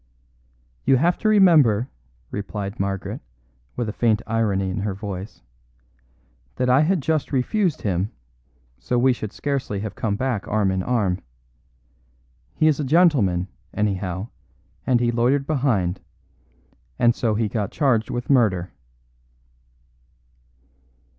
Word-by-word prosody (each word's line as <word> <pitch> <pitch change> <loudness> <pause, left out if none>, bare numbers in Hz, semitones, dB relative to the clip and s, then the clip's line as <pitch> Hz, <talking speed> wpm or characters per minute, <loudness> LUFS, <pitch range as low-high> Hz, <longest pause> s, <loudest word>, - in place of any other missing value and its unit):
"You 135 0 +4
have 170 +6 +2
to 215 - +1
remember," 155 - +5 0.4
replied 100 +1 -5
Margaret, 95 0 -3 0.5
with 120 -2 -2
a 105 - -3
faint 115 -2 +1
irony 100 -4 0
in 90 - -3
her 100 -1 -2
voice, 100 - -7 1.1
"that 125 0 +1
I 130 +3 +5
had 170 +2 +2
just 155 0 -1
refused 165 - 0
him, 95 0 -1 0.7
so 125 - -1
we 130 +1 +4
should 110 -4 -6
scarcely 135 -9 -3
have 110 -1 -5
come 105 -3 -2
back 115 -5 -2
arm 100 -2 +1
in 95 0 -1
arm. 100 -5 0 1.4
He - - +1
is 155 -2 +3
a - - 0
gentleman, 130 - +3 0.3
anyhow; 100 0 -2 0.6
and 125 -2 +3
he 120 -1 +1
loitered 125 +4 +1
behind 120 - 0 1.0
and 120 0 +4
so 115 -3 0
got 105 -2 -1
charged 125 -7 +1
with 120 0 -4
murder." 105 -10 +2
115 Hz, 125 wpm, -23 LUFS, 100-135 Hz, 1.4 s, remember